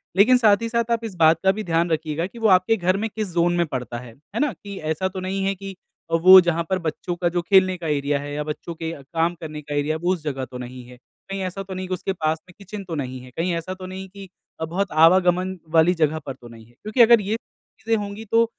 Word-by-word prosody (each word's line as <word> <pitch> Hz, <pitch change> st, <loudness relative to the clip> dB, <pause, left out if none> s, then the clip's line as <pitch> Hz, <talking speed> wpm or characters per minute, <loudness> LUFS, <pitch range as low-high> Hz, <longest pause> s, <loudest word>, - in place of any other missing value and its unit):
लेकिन 225 Hz, +7 st, +6 dB
साथ 215 Hz, -4 st, +4 dB
ही 230 Hz, -, -2 dB
साथ 235 Hz, 0 st, -1 dB
आप 230 Hz, 0 st, 0 dB
इस 210 Hz, -4 st, -6 dB
बात 165 Hz, -1 st, +4 dB
का 190 Hz, -, +5 dB
भी 215 Hz, +2 st, -4 dB
ध्यान 170 Hz, -1 st, +1 dB
रखिएगा 160 Hz, +1 st, -1 dB
कि 235 Hz, +4 st, -13 dB
वो 225 Hz, -, +2 dB
आपके 185 Hz, +3 st, +4 dB
घर 185 Hz, 0 st, +1 dB
में 220 Hz, +2 st, -2 dB
किस 215 Hz, 0 st, -4 dB
ज़ोन 175 Hz, -1 st, +1 dB
में 170 Hz, -, +2 dB
पड़ता 125 Hz, -4 st, -4 dB
है, 120 Hz, -2 st, -11 dB, 0.2 s
है -, -, 0 dB
ना? 295 Hz, 0 st, +2 dB
कि 200 Hz, +1 st, -10 dB
ऐसा 160 Hz, +4 st, -1 dB
तो 190 Hz, 0 st, -6 dB
नहीं 190 Hz, +1 st, -2 dB
है 195 Hz, -, +1 dB
कि 195 Hz, 0 st, -8 dB, 0.4 s
वो 185 Hz, +3 st, +9 dB
जहाँ 170 Hz, -1 st, 0 dB
पर 190 Hz, -1 st, +1 dB
बच्चों 175 Hz, +1 st, -3 dB
का 175 Hz, 0 st, 0 dB
जो 175 Hz, 0 st, -1 dB
खेलने 185 Hz, +1 st, +4 dB
का 170 Hz, -2 st, -6 dB
एरिया 145 Hz, -1 st, 0 dB
है 145 Hz, +1 st, -6 dB
या 150 Hz, +1 st, -2 dB
बच्चों 155 Hz, +3 st, -6 dB
के 165 Hz, 0 st, -4 dB
काम 165 Hz, +4 st, 0 dB
करने 155 Hz, -2 st, -6 dB
का 145 Hz, 0 st, -6 dB
एरिया 145 Hz, +2 st, 0 dB
है -, -, -5 dB
वो 180 Hz, +1 st, +3 dB
उस 170 Hz, -5 st, -6 dB
जगह 135 Hz, -3 st, -3 dB
तो 125 Hz, -, -9 dB
नहीं 125 Hz, 0 st, -8 dB
है। 125 Hz, 0 st, -14 dB, 0.3 s
कहीं 195 Hz, 0 st, -3 dB
ऐसा 185 Hz, +1 st, -4 dB
तो 190 Hz, 0 st, -8 dB
नहीं 185 Hz, 0 st, -4 dB
है -, -, -8 dB
कि 185 Hz, -, -3 dB
उसके 185 Hz, +1 st, -2 dB
पास 160 Hz, -3 st, -1 dB
में -, -, -14 dB
किचन 200 Hz, +1 st, -8 dB
तो 175 Hz, -3 st, -6 dB
नहीं 130 Hz, -3 st, -4 dB
है। 125 Hz, 0 st, -13 dB
कहीं 175 Hz, +2 st, 0 dB
ऐसा 170 Hz, +3 st, -4 dB
तो 185 Hz, 0 st, -9 dB
नहीं 190 Hz, +1 st, -7 dB
कि 195 Hz, 0 st, -11 dB, 0.3 s
बहुत 180 Hz, +5 st, -2 dB
आवागमन 180 Hz, +3 st, +4 dB, 0.2 s
वाली 165 Hz, +2 st, +5 dB
जगह 160 Hz, -2 st, +1 dB
पर 135 Hz, -, -4 dB
तो 120 Hz, -, -14 dB
नहीं 115 Hz, -1 st, -13 dB
है। 120 Hz, -, -23 dB
क्योंकि 215 Hz, +4 st, +2 dB
अगर 235 Hz, -1 st, +7 dB
ये 205 Hz, +2 st, -1 dB, 0.4 s
चीज़ें 225 Hz, 0 st, 0 dB
होंगी 205 Hz, +2 st, -7 dB
तो 230 Hz, +2 st, +3 dB
180 Hz, 275 wpm, -23 LUFS, 155-195 Hz, 0.4 s, वो